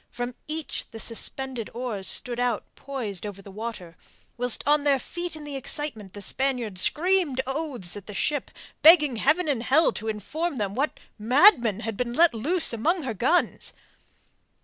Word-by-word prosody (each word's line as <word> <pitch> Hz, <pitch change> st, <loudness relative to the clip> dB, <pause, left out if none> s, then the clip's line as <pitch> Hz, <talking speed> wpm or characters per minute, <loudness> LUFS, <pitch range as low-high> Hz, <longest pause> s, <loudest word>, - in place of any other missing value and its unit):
From 245 Hz, +1 st, -5 dB
each 310 Hz, 0 st, -4 dB
the 225 Hz, -, -9 dB
suspended 240 Hz, +1 st, -2 dB
oars 235 Hz, -6 st, -3 dB
stood 245 Hz, -2 st, +3 dB
out 245 Hz, -3 st, 0 dB
poised 240 Hz, -9 st, -5 dB
over 205 Hz, -2 st, -6 dB
the 195 Hz, 0 st, -12 dB
water, 205 Hz, -5 st, -7 dB, 0.4 s
whilst 245 Hz, -1 st, +1 dB
on 295 Hz, 0 st, +3 dB
their 285 Hz, -2 st, +3 dB
feet 345 Hz, +5 st, -6 dB
in 310 Hz, -, -9 dB
the 290 Hz, -1 st, -7 dB
excitement 260 Hz, -7 st, -3 dB
the 205 Hz, -, -8 dB
Spaniards 240 Hz, -7 st, -1 dB
screamed 345 Hz, -, +2 dB
oaths 270 Hz, -, -4 dB
at 205 Hz, -, -9 dB
the 210 Hz, -, -8 dB
ship, 290 Hz, +5 st, -1 dB, 0.3 s
begging 305 Hz, -6 st, +7 dB
Heaven 310 Hz, +9 st, +2 dB
and 275 Hz, -6 st, 0 dB
Hell 290 Hz, +7 st, +4 dB
to 220 Hz, -, -7 dB
inform 295 Hz, -, -3 dB
them 200 Hz, -3 st, -2 dB
what 275 Hz, +7 st, -2 dB, 0.2 s
madman 240 Hz, -, +5 dB
had 225 Hz, -3 st, -4 dB
been 240 Hz, -1 st, -2 dB
let 330 Hz, +2 st, +4 dB
loose 305 Hz, +8 st, +3 dB
among 320 Hz, -, 0 dB
her 250 Hz, -4 st, -3 dB
guns. 260 Hz, -, +1 dB
250 Hz, 170 wpm, -25 LUFS, 220-300 Hz, 0.4 s, begging